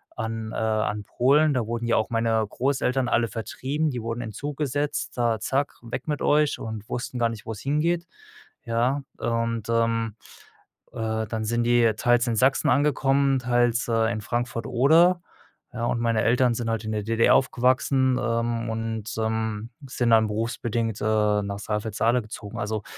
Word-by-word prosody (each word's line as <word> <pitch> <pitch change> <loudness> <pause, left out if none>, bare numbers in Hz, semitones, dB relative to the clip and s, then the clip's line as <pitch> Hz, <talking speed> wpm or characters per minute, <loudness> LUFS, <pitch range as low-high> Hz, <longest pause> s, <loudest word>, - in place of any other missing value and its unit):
an 110 0 -4
äh, - - -6
an 110 -1 -1
Polen. 140 +7 +3
Da 120 -4 -1
wurden 120 0 -3
ja 115 - +3
auch 110 - 0
meine 115 -1 +1
Großeltern 130 +1 0
alle 120 0 +2
vertrieben, 135 +8 -2
die 125 -3 -4
wurden 115 +1 -4
in 110 - -5
'n - - -16
Zug 145 +6 -5
gesetzt, 145 -2 -2
da 115 -3 +1
zack, 135 +6 -1
weg 120 +6 -6
mit 150 -1 -2
euch 150 0 +3
und 110 -1 -7
wussten 125 +1 -4
gar 115 -1 +2
nicht, 115 -2 -8
wo's 110 -2 -6
hingeht, 165 +5 0 0.6
ja? 120 +5 +1 0.2
Und, 115 -1 -2
ähm, 115 -1 +1 0.8
äh, 110 0 -2
dann 110 0 -3
sind 120 +2 0
die 120 -1 +4
teils 120 +1 +3
in 115 - 0
Sachsen 130 +4 +3
angekommen, 140 -1 +2
teils, 120 -1 +1
äh, 115 0 +2
in 110 -2 -3
Frankfurt 120 0 -3
Oder, 165 +8 +4 0.5
ja, 120 -1 -2
und 120 - 0
meine 115 -2 +1
Eltern 125 0 +3
sind 115 -1 -3
halt 115 -1 -1
in 110 - -3
der 105 - -1
DDR 115 +1 +3
aufgewachsen, 130 0 +2
ähm, 115 -1 -1
und, 110 -1 -3
ähm, 110 0 -2 0.2
sind 120 -2 0
dann 110 -1 +5
berufsbedingt, 115 0 -2
äh, 105 -1 +2
nach 100 0 -4
Saalfeld-Saale 110 +3 0
gezogen. 105 0 -8
Also, 105 0 -2
115 Hz, 170 wpm, -25 LUFS, 110-130 Hz, 0.8 s, dann